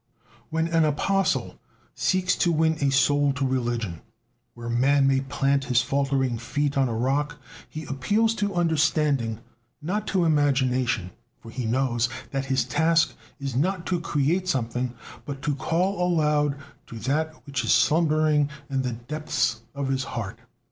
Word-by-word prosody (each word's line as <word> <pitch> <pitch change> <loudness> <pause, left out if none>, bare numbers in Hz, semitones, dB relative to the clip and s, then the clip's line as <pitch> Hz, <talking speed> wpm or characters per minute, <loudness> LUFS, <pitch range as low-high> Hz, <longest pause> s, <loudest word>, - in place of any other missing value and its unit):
When 160 0 0
an 165 -1 +2
apostle 185 +6 0 0.3
seeks 185 -1 +1
to 175 - +2
win 160 0 +3
a 140 - +3
soul 145 +1 +3
to 140 0 -1
religion, 120 -9 -2 0.5
where 120 0 -8
man 135 +4 +3
may 135 -1 +3
plant 135 0 0
his 125 -1 +2
faltering 135 -3 0
feet 140 +4 -1
on 135 -2 +2
a - - -2
rock, 140 +5 0 0.3
he 155 0 -6
appeals 205 - +1
to 200 -2 0
understanding, 150 -8 +1 0.4
not 195 +8 -3
to 185 -3 +1
imagination, 130 - +1 0.3
for 115 - -12
he 120 -1 -3
knows 120 -1 +1 0.2
that 135 -1 -2
his 130 -2 +1
task 160 +6 +2 0.3
is 135 -3 -4
not 175 +5 0
to 180 -2 0
create 165 +4 0
something, 125 -4 -1 0.3
but 140 -1 -7
to 150 -1 +1
call 175 +7 0
aloud 150 -4 +2 0.3
to 115 - -8
that 150 +7 -1
which 140 -2 -2
is - - +1
slumbering 150 +4 +3 0.2
in 135 -1 +1
the 125 -2 -2
depths 120 -1 -2
of 140 -1 -2
the 130 -1 -3
heart. 110 -5 -5
140 Hz, 155 wpm, -25 LUFS, 125-160 Hz, 0.5 s, win